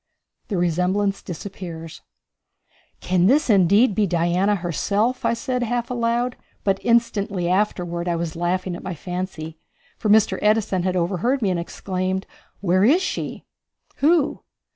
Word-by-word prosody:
The 200 - -2
Resemblance 180 +4 +1
Disappears. 170 -2 -8 1.0
"Can 180 0 +2
this 270 +1 +3
indeed 200 +4 +5
be 210 0 +2
Diana 175 +4 +2
herself?" 200 +7 -1
I - - +2
said 250 +2 -2
half 240 +1 -1
aloud, 240 0 0 0.3
but 195 -1 +1
instantly 205 -6 +1
afterward 180 -2 0
I 170 - +1
was 165 -2 -3
laughing 180 +1 -1
at - - -8
my 185 -2 -5
fancy, 165 -2 -5 0.4
for 215 - -1
Mr. 215 +1 +4
Edison 210 -3 +2
had 185 +1 -1
overheard 195 +9 0
me 195 - +2
and 175 - -1
exclaimed, 185 +2 -3 0.4
"Where 185 0 +2
is 315 - +4
she?" - - -4 0.5
"Who?" 305 0 +2
190 Hz, 140 wpm, -22 LUFS, 175-225 Hz, 1.0 s, indeed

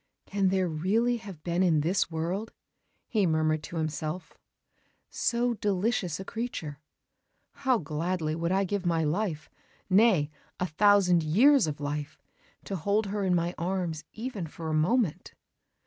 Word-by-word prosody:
"Can 195 -1 0
there 185 -1 +2
really 205 +10 +1
have 195 -8 -10
been 175 +1 0
in 165 -5 +3
this 175 +6 +1
world," 175 +7 -3 0.6
he 210 -5 +2
murmured 155 -1 +1
to - - -9
himself, 155 +2 -3 0.8
"so 240 +1 +1
delicious 200 -5 -1
a 190 - -6
creature? 190 - -5 0.7
How 260 -2 +1
gladly 160 0 -2
would 165 +2 -1
I 195 +1 +2
give 195 0 -2
my 165 -2 +1
life 155 0 -1 0.4
nay, 185 -7 +4 0.3
a 180 - +1
thousand 180 0 +4
years 225 - +5
of 150 -1 -4
life! 145 0 -4 0.4
to 195 - -4
hold 205 +6 +1
her 200 +1 -2
in 185 -2 +2
my 170 +1 0
arms 175 -3 -2
even 220 -7 -5
for 160 +1 -6
a - - -1
moment!" 175 +4 +1
180 Hz, 150 wpm, -28 LUFS, 155-205 Hz, 0.8 s, years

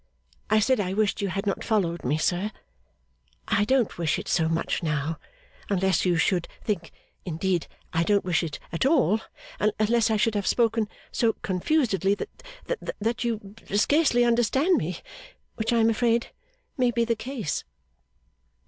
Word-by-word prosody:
I 215 0 +5
said 250 +3 +2
I 190 -2 -1
wished 210 -1 +1
you 200 - 0
had 195 +2 -3
not 195 - -1
followed 175 -6 0
me, 145 +5 +1
sir. 180 +6 0 1.0
I 205 - +2
don't 250 -6 +1
wish 160 -3 +1
it - - -6
so 160 -2 +2
much 165 0 -1
now, 150 -1 -1 0.5
unless 190 -1 +2
you 175 -2 +3
should 175 +2 +1 0.2
think 180 -7 -2 0.3
indeed 175 0 -1 0.3
I 165 - +2
don't 200 +3 +2
wish 170 -5 +2
it 160 -3 -4
at 165 - -1
all, 260 - +3 0.6
unless 230 +2 +2
I 220 - +2
should 225 +1 +2
have 205 -2 -1
spoken 225 -2 +2 0.2
so 230 -2 +2
confusedly, 195 - +1
that 425 - -5 0.7
that 230 +3 -1
you 215 -4 -3
can 205 - -1
scarcely 255 0 +4
understand 240 - +3
me, 170 +2 -3 0.5
which 220 +2 -2
I 235 - +3
am 225 0 +4
afraid 230 +1 +1 0.5
may 250 -1 +4
be 235 0 +1
the 230 0 +1
case. 230 - -3
210 Hz, 160 wpm, -26 LUFS, 180-230 Hz, 1.0 s, I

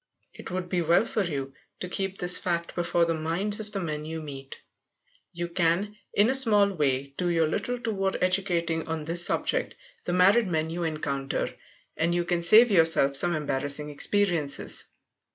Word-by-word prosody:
It - - -11
would 180 0 -4
be 180 -1 -1
well 170 +6 +2
for 220 -2 -2
you 135 -6 -5 0.3
to 180 - -5
keep 195 +1 -4
this 180 -1 +4
fact 170 -1 -3
before 170 -1 0
the 165 - -1
minds 170 +7 -2
of 210 -1 -7
the 200 - -4
men 155 -4 -4
you 160 +1 -6
meet. 135 -3 -9 0.7
You 175 -1 -5
can, 175 +4 -1 0.2
in 205 +2 +4
a 260 - +1
small 210 -6 +2
way, 140 -4 -2
do 180 -1 -1
your 165 -2 +1
little 245 +10 -3
toward 205 -5 -2
educating 175 -3 -1
on 160 -2 -4
this 170 +2 +5
subject - - 0 0.3
the 175 - -2
married 195 +5 +4
men 160 -2 -2
you 175 +1 -5
encounter. 140 -4 -3 0.4
And 170 +2 0
you 175 0 -1
can 175 -1 -1
save 215 +7 +6
yourself 165 -6 +4
some 175 +5 +3
embarrassing 145 0 -3
experiences. 165 -3 +3
170 Hz, 175 wpm, -26 LUFS, 155-195 Hz, 0.7 s, save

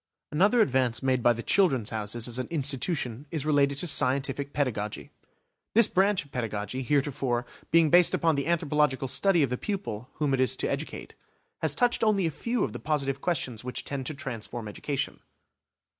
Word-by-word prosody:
Another 200 +10 +4
advance 130 - +1
made 130 -1 +1
by 120 - +5
the 115 0 -3
"Children's 135 - +2
Houses" 110 +1 -3
as 120 +1 -3
an 130 - -3
institution 140 -3 -1
is 150 -2 -3
related 140 -2 +2
to 160 - -1
scientific 140 -1 +1
pedagogy. 110 -8 -3 0.6
This 230 -1 +8
branch 195 -2 +2
of 140 - -22
pedagogy, 110 0 -3
heretofore, 130 -3 0 0.2
being 165 -2 +4
based 175 0 +6
upon 165 -1 +2
the 140 0 -2
anthropological 150 -5 +1
study 175 +4 +3
of 130 - -1
the 125 - -2
pupil 180 - -4
whom 145 -3 -1
it 135 - +1
is 130 - +2
to - - -2
educate, - - -5 0.5
has 155 -3 +1
touched 240 +3 +2
only 205 -4 +2
a 165 - 0
few 235 - -2
of - - -2
the - - -6
positive 140 -3 -1
questions 130 -10 -2
which 125 0 -4
tend 135 -3 -4
to 155 - -4
transform 120 -4 -6
education. 135 +6 -3
140 Hz, 180 wpm, -27 LUFS, 125-160 Hz, 0.6 s, This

